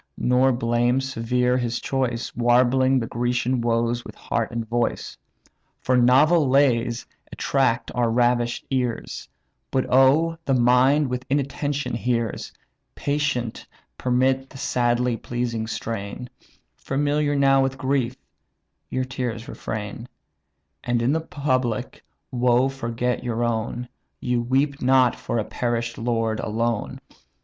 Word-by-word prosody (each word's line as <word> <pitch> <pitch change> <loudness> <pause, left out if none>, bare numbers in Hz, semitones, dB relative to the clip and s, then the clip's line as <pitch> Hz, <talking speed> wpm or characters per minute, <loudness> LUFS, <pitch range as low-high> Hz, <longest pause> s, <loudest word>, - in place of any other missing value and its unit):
nor 125 +2 +3
blame 120 +1 +1
severe 125 -1 0
his 120 -1 -2
choice, 125 -3 -2
Warbling 125 +2 +3
the 120 - 0
Grecian 120 +1 -1
woes 120 +1 0
with - - -11
heart 115 -2 -2
and 115 -1 -4
voice; 120 +1 -2 0.6
For 130 - +1
novel 135 +5 +5
lays 125 -3 +2 0.3
attract 130 -4 0
our 120 -2 +1
ravish'd 120 0 +1
ears; 125 - -2 0.4
But 130 - 0
old, 155 +6 +4
the 135 - +2
mind 130 +4 +4
with 125 0 -3
inattention 140 -1 -1
hears: 115 -1 -2 0.4
Patient 145 -5 -2 0.3
permit 130 +1 +1
the 135 - -12
sadly 120 -2 +1
pleasing 120 -2 -3
strain; 115 +1 -5 0.4
Familiar 145 +1 0
now 135 -1 +4
with 135 0 -1
grief, 130 -2 0 0.7
your 130 0 -1
tears 125 -3 -4
refrain, 110 +2 -6 0.8
And 120 -1 0
in 125 - +2
the 160 - 0
public 130 -7 -2 0.3
woe 125 +1 +3
forget 125 -2 -2
your 120 -1 -1
own; 120 +1 -2 0.3
You 125 -1 0
weep 135 +4 0
not 130 -1 +4
for - - -3
a 110 - +1
perish'd 120 -1 -2
lord 115 -2 -1
alone. 115 0 -2
125 Hz, 120 wpm, -23 LUFS, 120-135 Hz, 0.8 s, novel